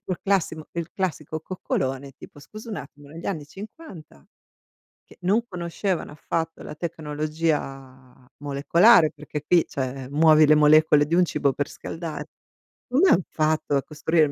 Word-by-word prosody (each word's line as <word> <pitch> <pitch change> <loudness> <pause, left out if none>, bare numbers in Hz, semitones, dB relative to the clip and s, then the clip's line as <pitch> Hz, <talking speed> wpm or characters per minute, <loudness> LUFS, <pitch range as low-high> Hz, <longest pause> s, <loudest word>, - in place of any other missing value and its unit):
tipo 200 -2 -5
il - - -4
classimo 175 -5 0
il 170 0 -4
classico 160 -4 -3
coccolone, 135 -6 -3
tipo: - - -13
"Scusa 215 - -11
un 210 - -4
attimo 145 0 -11
negli 165 +3 -9
anni 160 -7 -3
'50, 190 - -12 0.8
che - - -18
non 205 +6 +2
conoscevano 175 -2 -3
affatto 165 +2 -4
la - - -8
tecnologia 150 -5 -4
molecolare, 155 +6 +4
perché 150 - -7
qui 175 -2 +5
cioè 130 -1 -5
muovi 155 +1 +6
le 155 - +6
molecole 150 0 +5
di 165 - -1
un 180 - +5
cibo 145 -4 0
per 145 +1 -3
scaldare, 165 -2 -6 0.6
come 310 +10 +4
han 185 - +5
fatto 155 -2 0
a 140 - +1
costruire 155 +1 +1
il 145 - -4
155 Hz, 155 wpm, -24 LUFS, 145-175 Hz, 0.8 s, muovi